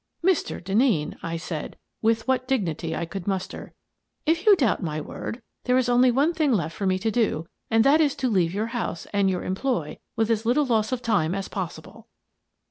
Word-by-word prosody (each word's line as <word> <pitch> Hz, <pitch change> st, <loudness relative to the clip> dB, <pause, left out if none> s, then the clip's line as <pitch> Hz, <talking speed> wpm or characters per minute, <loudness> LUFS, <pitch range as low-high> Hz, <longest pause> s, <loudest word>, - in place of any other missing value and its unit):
" -, -, -50 dB
Mr. 375 Hz, -3 st, +1 dB
Denneen," 195 Hz, -, +1 dB, 0.2 s
said 160 Hz, -2 st, -5 dB
I, -, -, -34 dB, 0.2 s
with 225 Hz, +1 st, +1 dB
what 255 Hz, -1 st, +1 dB
dignity 170 Hz, -, -1 dB
I 170 Hz, -, -2 dB
could 185 Hz, +2 st, -7 dB
muster, 190 Hz, -2 st, -4 dB, 0.2 s
" -, -, -53 dB
if 330 Hz, +5 st, +1 dB
you 415 Hz, -, +9 dB
doubt 260 Hz, -, +1 dB
my 155 Hz, -4 st, -2 dB
word, 230 Hz, -, -6 dB, 0.2 s
there 250 Hz, 0 st, +3 dB
is 255 Hz, -1 st, +2 dB
only 245 Hz, +1 st, +5 dB
one 280 Hz, +7 st, +2 dB
thing 310 Hz, -4 st, +1 dB
left 165 Hz, -8 st, 0 dB
for 200 Hz, -3 st, -2 dB
me 185 Hz, 0 st, +2 dB
to 220 Hz, +4 st, -1 dB
do, 215 Hz, -9 st, 0 dB, 0.2 s
and 225 Hz, 0 st, +4 dB
that 290 Hz, +5 st, +5 dB
is 290 Hz, -3 st, +2 dB
to 260 Hz, -, -1 dB
leave 185 Hz, -7 st, +2 dB
your 205 Hz, +4 st, -1 dB
house 225 Hz, -8 st, -3 dB
and 200 Hz, -1 st, +3 dB
your 180 Hz, -1 st, -1 dB
employ 190 Hz, -, -2 dB, 0.2 s
with 225 Hz, 0 st, +1 dB
as 220 Hz, -1 st, +1 dB
little 255 Hz, +6 st, +2 dB
loss 220 Hz, -3 st, +1 dB
of 250 Hz, -1 st, -2 dB
time 195 Hz, -7 st, +1 dB
as 195 Hz, -1 st, -3 dB
possible." 185 Hz, -4 st, -7 dB
225 Hz, 215 wpm, -25 LUFS, 185-255 Hz, 0.2 s, you